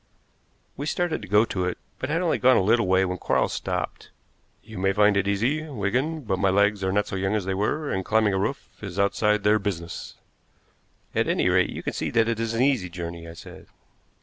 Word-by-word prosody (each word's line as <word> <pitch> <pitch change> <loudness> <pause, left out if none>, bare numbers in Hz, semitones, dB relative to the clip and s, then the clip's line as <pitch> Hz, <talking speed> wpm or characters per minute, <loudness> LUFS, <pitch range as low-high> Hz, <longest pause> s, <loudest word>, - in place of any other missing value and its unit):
We 145 +3 -4
started 175 -3 -1
to 105 - -9
go 105 +4 +4
to 95 -5 -2
it, 90 - -2 0.2
but 130 - -3
had 165 +4 0
only 170 - +1
gone 130 0 +5
a - - +3
little 115 +1 +3
way 95 +1 +3
when 90 -1 -3
Quarles - - +1
stopped. - - -4 0.5
"You 110 -3 -9
may 95 +1 +2
find 105 0 +4
it 100 0 +1
easy, 115 +10 +1
Wigan, 130 +7 -1
but 100 -7 -2
my 95 - +3
legs 100 +1 +2
are 95 - +1
not 105 +1 +1
so - - -5
young 95 +2 0
as 105 -4 -1
they 95 - -1
were, 140 +10 -1
and 95 - -1
climbing 110 0 +2
a 95 - +1
roof 110 +8 -2 0.2
is 95 -3 -7
outside 105 +1 +2
their 105 +1 +4
business." 85 -5 -5 1.0
"At - - +1
any - - +2
rate, - - +3
you - - -6
can - - -3
see - - -2
that 115 -1 +2
it 115 -1 -1
is 115 0 -2
an 120 - +2
easy 130 -10 +1
journey," 85 -1 -7
I 80 - -9
said. 85 - -12
105 Hz, 230 wpm, -25 LUFS, 95-115 Hz, 1.0 s, gone